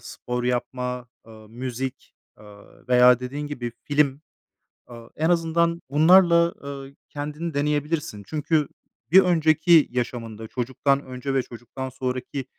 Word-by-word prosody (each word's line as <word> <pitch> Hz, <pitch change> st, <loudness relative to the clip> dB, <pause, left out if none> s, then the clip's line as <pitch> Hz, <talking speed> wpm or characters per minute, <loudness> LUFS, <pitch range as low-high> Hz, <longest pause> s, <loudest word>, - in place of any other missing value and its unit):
spor 125 Hz, +1 st, -5 dB
yapma, 125 Hz, 0 st, -3 dB, 0.2 s
ııı, 110 Hz, -1 st, -14 dB
müzik, 130 Hz, +2 st, -6 dB, 0.3 s
ııı, 105 Hz, -1 st, -17 dB
veya, 125 Hz, 0 st, +6 dB
dediğin 140 Hz, +4 st, -5 dB
gibi, 120 Hz, -5 st, -5 dB
film. 145 Hz, -2 st, +1 dB, 0.7 s
Aaa, 115 Hz, -1 st, -12 dB
en 160 Hz, +3 st, +1 dB
azından 170 Hz, 0 st, +1 dB
bunlarla, 170 Hz, +2 st, +5 dB
ııı, 140 Hz, -1 st, -8 dB
kendini 150 Hz, +2 st, -5 dB
deneyebilirsin. 150 Hz, -6 st, -1 dB
Çünkü 155 Hz, -1 st, 0 dB, 0.4 s
bir 190 Hz, -, +10 dB
önceki 160 Hz, -2 st, +4 dB
yaşamında, 115 Hz, -3 st, -4 dB
çocuktan 135 Hz, +3 st, -1 dB
önce 130 Hz, +1 st, -5 dB
ve 135 Hz, -, +2 dB
çocuktan 120 Hz, +3 st, -8 dB
sonraki 130 Hz, +1 st, -4 dB
135 Hz, 120 wpm, -24 LUFS, 125-150 Hz, 0.7 s, bir